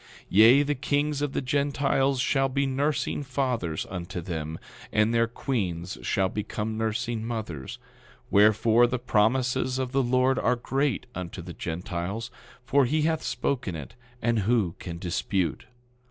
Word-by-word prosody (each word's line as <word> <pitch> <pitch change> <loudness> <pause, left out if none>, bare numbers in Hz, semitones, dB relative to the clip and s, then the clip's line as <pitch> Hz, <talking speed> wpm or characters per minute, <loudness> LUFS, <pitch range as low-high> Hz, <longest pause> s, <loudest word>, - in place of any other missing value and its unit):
10:9 - - -22 0.2
Yea, 115 +8 +7
the 145 +1 0
kings 145 +1 0
of 145 -2 -1
the - - -1
Gentiles 140 0 +1
shall 135 +1 +2
be 140 +1 0
nursing 140 +3 0
fathers 125 - -2
unto 90 0 -5
them, 80 -2 -4 0.3
and 110 +1 +2
their 115 0 +3
queens 95 -8 -3
shall 95 -2 +1
become 105 +2 -3
nursing 110 +1 -2
mothers; 110 - -5 0.5
wherefore, 110 +3 +5
the 125 - -1
promises 125 +2 +1
of 130 -1 -2
the 135 +1 +2
Lord 130 +1 +2
are 125 - +2
great 135 +2 -1
unto 90 0 -6
the 85 0 -8
Gentiles, 90 +8 -4 0.3
for 135 +1 +4
he 150 +5 +1
hath 160 0 +1
spoken 120 -10 -2
it, 75 -4 -8 0.3
and 115 -1 +2
who 105 -4 +1
can 85 -2 -6
dispute? 90 -1 -2
120 Hz, 150 wpm, -27 LUFS, 95-135 Hz, 0.5 s, Yea